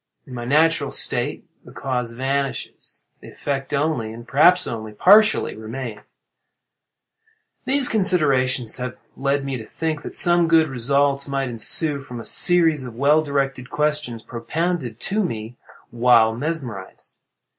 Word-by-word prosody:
In 130 - -12
my 120 -1 -6
natural 160 +5 +2
state, - - -1 0.2
the - - -14
cause 125 -3 -4
vanishing, 135 +1 -2 0.5
the - - -13
effect 135 -2 -4
only, 140 -6 -1
and 115 +1 -11
perhaps 165 +6 +4
only 110 -2 -6
partially, 210 - +4
remains. 110 0 -7 1.7
"These 270 -1 +2
considerations 140 - +1
have 125 -1 -5 0.2
led 140 0 -1
me 135 -1 -3
to 110 - -9
think 160 -2 -3
that - - -7
some 175 -1 +5
good 160 -1 +3
results 140 +2 0
might 135 -1 -2
ensue 140 +6 +1
from 125 -3 -9
a 115 - -9
series 165 -5 +3
of 125 -3 -9
well 145 +5 +3
directed 135 -3 -2
questions 150 -6 -1
propounded 125 +1 -3
to 210 +2 0
me 115 - -5 0.4
while 115 -2 +4
mesmerized. 125 - -6
135 Hz, 135 wpm, -21 LUFS, 120-155 Hz, 1.7 s, some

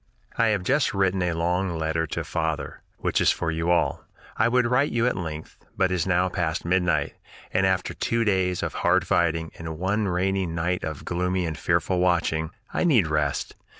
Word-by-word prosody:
"I 115 - +3
have 105 -4 +1
just 135 +2 +1
written 95 -1 +1
a 90 -1 0
long 90 +1 0
letter 80 0 -1
to - - -3
father, 80 -1 -3 0.2
which - - 0
is - - +4
for 80 - 0
you 80 +1 -1
all. 85 - +1 0.3
I - - +3
would 125 +1 +3
write 125 +4 +2
you 115 0 +1
at 125 - +1
length, 80 -3 -6 0.2
but 95 - +2
it - - +1
is 90 -1 0
now 90 0 +2
past 85 -3 -2
midnight, 90 0 +1 0.4
and 95 +1 +3
after 95 -1 0
two 115 0 0
days 95 -3 +1
of - - -2
hard - - +2
fighting 80 -1 +1
and 80 -1 -6
one 100 +4 0
rainy 95 +1 0
night 85 +2 -2
of 75 -3 -5
gloomy 90 +1 -1
and 80 -1 -3
fearful 90 +4 0
watching, 85 -3 +1 0.2
I - - 0
need 135 - +4
rest. 75 -2 -1
90 Hz, 195 wpm, -25 LUFS, 80-95 Hz, 0.4 s, is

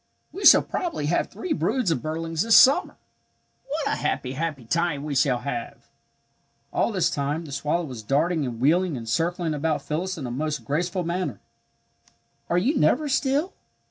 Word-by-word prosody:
"We 390 - -5
shall - - +9
probably 335 - -3
have 165 +4 +1
three 365 -4 -3
broods 255 - 0
of 150 - -1
birdlings 165 +1 -3
this 225 +1 +6
summer. 270 - +5 0.7
What 295 +1 -3
a - - 0
happy, 125 - -2
happy 145 -3 -4
time 165 +1 -1
we 150 -1 -4
shall 130 -2 +2
have!" 120 -5 -6 0.9
All - - +1
this 185 -5 +1
time 150 +1 -2
the 145 - -10
swallow 150 +5 -1
was 125 -6 -7
darting 155 +8 +1
and 120 -4 -4
wheeling 165 +3 +2
and 115 -1 -8
circling 165 +6 -1
about 150 -1 -1
Phyllis 180 +5 -3
in 145 - -5
a 120 - -4
most 150 +4 -3
graceful 175 +5 -1
manner. 175 +2 -3 1.1
"Are 175 - +2
you 265 - +1
never 305 - +2
still?" 280 +6 0
160 Hz, 175 wpm, -24 LUFS, 140-180 Hz, 1.1 s, shall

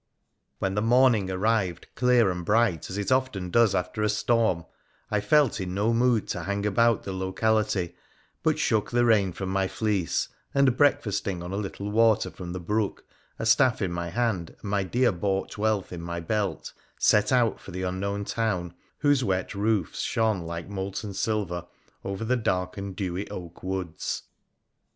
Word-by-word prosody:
When 95 0 -1
the 105 - 0
morning 115 -4 +4
arrived 95 -2 0
clear 125 -5 +4
and 90 -1 -4
bright, 105 -4 +2
as 95 - -5
it 100 +4 -2
often 130 -9 0
does 115 -1 +4
after 90 +4 -2
a 105 - +2
storm, 105 -5 +1 0.5
I 105 - +2
felt 135 +1 +3
in 90 0 -4
no 105 +4 +2
mood 120 -2 +2
to 90 - -2
hang 100 +3 -2
about 115 +2 +3
the 95 - -5
locality, 95 0 0 0.5
but - - +2
shook 110 -2 +1
the 120 0 +2
rain 105 -5 +4
from 95 +2 -5
my 95 0 +1
fleece, 100 -5 0 0.3
and 140 -3 +4
breakfasting 105 -10 +1
on 90 - -6
a - - -3
little 100 0 -4
water 110 0 +3
from 90 -2 -7
the 90 - -4
brook, 105 +4 -2 0.3
a - - -3
staff 125 +3 +4
in 95 -4 -1
my 85 0 -3
hand, 100 -4 -1
and 100 - -6
my 100 -1 +2
dear 120 +6 +2
bought 95 +2 -2
wealth 105 -3 0
in 85 - -6
my 85 0 -4
belt, 100 +3 -2 0.2
set 105 0 +3
out 120 -4 +3
for - - -12
the 95 +1 -4
unknown 100 +2 -2
town, 95 -8 -1 0.3
whose 145 -3 +3
wet 95 -2 -1
roofs 105 -3 0
shone 110 -4 +1
like 85 0 -5
molten 100 +1 -4
silver 95 -5 -2 0.4
over 100 +3 -4
the 125 +3 +2
dark 90 -6 -1
and 100 -2 -6
dewy 95 0 -3
oak 85 -2 -8
woods. 95 -3 -3
100 Hz, 175 wpm, -26 LUFS, 95-110 Hz, 0.5 s, morning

